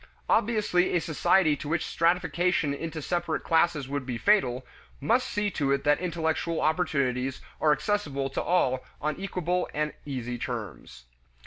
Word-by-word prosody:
Obviously 205 -6 +2
a - - +4
society 160 0 +3
to 145 - -7
which 165 +1 0
stratification 175 -2 +1
into 160 +1 -5
separate 175 -1 -1
classes 160 -4 +2
would 140 0 -3
be 125 -2 -4
fatal, 130 - +2 0.3
must 230 - +1
see 210 -1 -1
to 140 -5 0
it 140 0 +1
that 145 0 +3
intellectual 165 -1 -1
opportunities 140 -6 0 0.2
are 155 - +4
accessible 150 -5 0
to 135 - -3
all 130 -8 +1 0.2
on 150 +1 -1
equable 180 -2 -1
and 150 0 -1
easy 125 -4 -4
terms. 110 - -6
155 Hz, 145 wpm, -27 LUFS, 135-180 Hz, 0.3 s, a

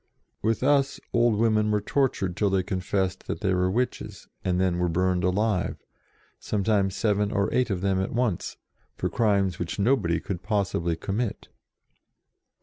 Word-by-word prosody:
With 115 +3 0
us 140 0 +2
old 120 -2 +3
women 110 -1 +2
were 105 0 +2
tortured 105 -6 0
till 105 +1 +1
they 95 -1 +1
confessed 95 0 -2
that - - -4
they 95 - +1
were 90 0 +2
witches, 125 +6 -3 0.2
and 90 -1 0
then 90 -2 +1
were 90 0 +1
burned 90 +2 +1
alive, 95 +1 0 0.6
sometimes 100 -2 0
seven 105 -1 +1
or 100 +1 0
eight 125 -1 +2
of 95 -3 -2
them 95 -1 +1
at 95 - -3
once, 120 -6 -1 0.4
for - - -2
crimes 100 -5 +1
which 90 -1 -3
nobody 100 -7 +2
could 90 +1 -5
possibly 95 -6 0
commit. 105 +6 -3
100 Hz, 155 wpm, -26 LUFS, 90-110 Hz, 0.6 s, old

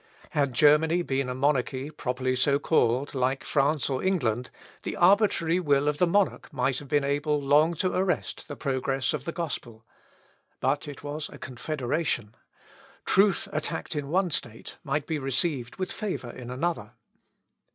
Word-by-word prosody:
Had 140 -3 +1
Germany 155 +6 +4
been 135 -3 -1
a 125 - -3
monarchy 135 0 0
properly 130 -2 -2
so 140 +2 +3
called, 135 -3 +1
like 130 0 0
France 145 0 +1
or 130 -2 -1
England, 125 - 0 0.3
the - - -4
arbitrary 180 -3 +4
will 145 -4 +2
of 150 0 0
the 180 - +4
monarch 200 0 +1
might 130 -2 0
have 145 - -11
been 145 +1 +2
able 145 +2 0
long 150 +4 +3
to 185 +3 0
arrest 185 -1 -1
the 145 - -6
progress 135 -1 -1
of 145 -2 -4
the 170 - -2
gospel. 125 -10 -5 0.7
But 140 +3 0
it 145 -1 -9
was 145 +1 -4
a - - -11
confederation. 130 -3 -2 0.7
Truth 195 0 +3
attacked 155 +1 -3
in 145 -2 -2
one 180 +2 +1
state 120 -6 -4
might 145 0 -1
be 160 -2 -2
received 135 -1 -1
with 185 -1 -3
favour 190 - -4
in 125 -1 -9
another. 125 -4 -2
145 Hz, 160 wpm, -27 LUFS, 130-160 Hz, 0.7 s, Germany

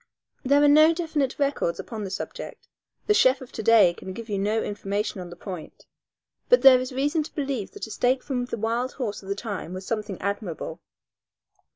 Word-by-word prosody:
There 280 +2 +4
are - - +6
no 310 +3 +6
definite 315 -6 -1
records 280 -12 0
upon 220 -3 -6
the 195 - -4
subject; 190 - -7 0.4
the 420 - +4
chef 260 -9 +4
of 260 - -11
to - - -5
day 215 -5 +6
can 185 +2 -8
give 230 +3 -8
you 200 -1 -1
no 210 +3 0
information 205 -1 -3
on 175 - -8
the 175 - -10
point, 180 -2 -9 0.6
but - - +5
there 260 -2 +9
is 255 +1 -4
reason 290 +5 0
to 300 - -8
believe 270 -8 -2
that - - -6
a 220 - -11
steak 255 +3 +1
from 250 -3 -2
the 245 - -5
wild 230 +4 -1
horse 220 -6 -4
of 195 - -11
the 200 - 0
time 200 -5 -5
was 185 +1 -7
something 210 -3 -3
admirable. 200 -5 -4
230 Hz, 205 wpm, -25 LUFS, 200-270 Hz, 0.6 s, there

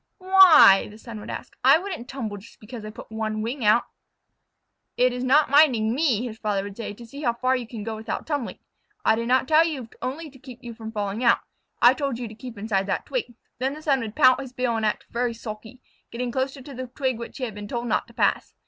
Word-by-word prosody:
"Why?" 370 - +7
the 210 - -13
son 225 -1 -9
would - - -10
ask. - - -7
"I 270 +4 +7
wouldn't 345 -9 -6
tumble 225 -7 -5
just 200 +3 -15
because 225 +1 -9
I 215 - -6
put 215 - -12
one 215 -1 -3
wing 245 +3 -4
out." 215 +3 +4 1.1
"It 250 0 +3
is 250 0 -4
not 275 +3 +3
minding 250 -7 +4
me," 255 -5 +1
his 220 -2 -7
father 205 -3 -1
would 200 -1 -8
say, 230 -1 -5
"to 235 - -12
see 280 +5 -10
how 240 -5 +1
far 255 +2 +1
you 245 -3 -4
can 225 -3 -7
go 220 0 -4
without 220 +1 -5
tumbling. 290 -6 -3 0.5
I 220 - +5
did 230 +1 -2
not 255 +1 +2
tell 315 +2 +6
you 280 -8 -4
only 295 +4 -5
to 265 - -17
keep 255 -1 -12
from 220 -1 -8
falling 210 +1 -3
out. 235 - +4 0.4
I 240 +1 +8
told 275 -3 -2
you 245 -1 -5
to 215 - -10
keep 235 +1 -10
inside 200 -2 -1
that - - -2
twig." 425 - -4 0.2
Then 265 +3 -1
the 305 - -10
son 275 -3 +2
would 225 -3 -6
pout 255 -2 +5
his 260 -2 -9
bill 250 -2 -1
and 220 -1 0
act 210 - -2
very 240 0 -1
sulky, 220 +2 -9 0.3
getting 245 +1 -4
close 265 +2 -2
to 270 - -11
the 255 -2 -7
twig 255 -1 -2
which 235 - -8
he 265 - -6
had 230 -4 -3
been 205 0 -8
told 240 +2 -3
not 230 - 0
to - - -17
pass. - - 0
240 Hz, 245 wpm, -24 LUFS, 220-265 Hz, 1.1 s, I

